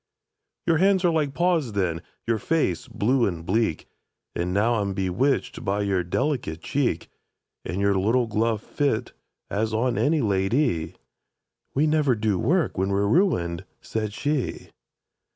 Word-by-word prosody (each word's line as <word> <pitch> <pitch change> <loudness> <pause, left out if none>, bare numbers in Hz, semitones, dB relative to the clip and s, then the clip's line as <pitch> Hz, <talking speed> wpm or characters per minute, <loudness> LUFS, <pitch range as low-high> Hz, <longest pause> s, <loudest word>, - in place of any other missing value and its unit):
—"Your 165 -2 +3
hands 190 +2 +3
were 175 - +4
like 150 -4 0
paws 170 -9 +1
then, 90 -5 -1 0.2
your 115 -1 0
face 100 - 0
blue 120 +3 +1
and 85 -3 -4
bleak, 110 -4 0 0.5
But 85 - -2
now 105 +6 +2
I'm 100 -1 -2
bewitched 95 +9 0
by 100 0 0
your 95 -3 +1
delicate 85 - -2
cheek, 125 - -1 0.6
And 90 +4 -4
your 100 0 +3
little 110 +6 +2
gloves 110 0 0
fit 130 -5 -1 0.4
as 110 +2 0
on 120 +2 +1
any 155 +2 +2
la 95 -4 +1
dy!"— 95 - 0 0.8
"We 145 +3 +3
never 150 -4 +3
do 105 -3 0
work 155 - +1
when 95 +1 +1
we're 100 +1 +1
ruined," 95 - +1 0.2
said 110 -2 -3
she. 140 +4 -2
110 Hz, 150 wpm, -25 LUFS, 95-145 Hz, 0.8 s, were